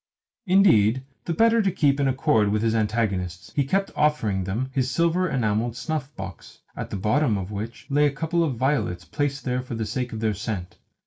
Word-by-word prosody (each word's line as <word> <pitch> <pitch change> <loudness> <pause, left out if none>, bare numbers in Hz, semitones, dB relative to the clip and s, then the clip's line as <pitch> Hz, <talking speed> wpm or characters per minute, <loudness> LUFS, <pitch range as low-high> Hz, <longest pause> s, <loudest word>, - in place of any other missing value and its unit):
Indeed, 130 - +4 0.2
the 170 - -1
better 230 +2 +4
to 200 - +2
keep 145 -5 +2
in 140 - +2
accord 130 -5 +2
with 105 +1 0
his 115 -1 +2
antagonists, 105 -5 -1
he 145 - +3
kept 195 +8 0
offering 110 -11 +1
them 120 +8 -2
his 130 -2 0
silver 170 +5 +1
enamelled 115 -2 0
snuff 155 0 -3
box 95 -3 -9
(at - - -5
the - - -4
bottom 110 +3 +2
of 95 +1 -5
which 110 +3 -6
lay 145 +1 +3
a - - 0
couple 160 +4 0
of 145 -6 -1
violets, 130 -8 0
placed 145 -1 -2
there 125 0 0
for 125 -2 -6
the 110 -1 -2
sake 125 +3 -3
of 110 - -5
their 110 -1 +1
scent). 95 -3 -5
125 Hz, 200 wpm, -24 LUFS, 105-150 Hz, 0.2 s, Indeed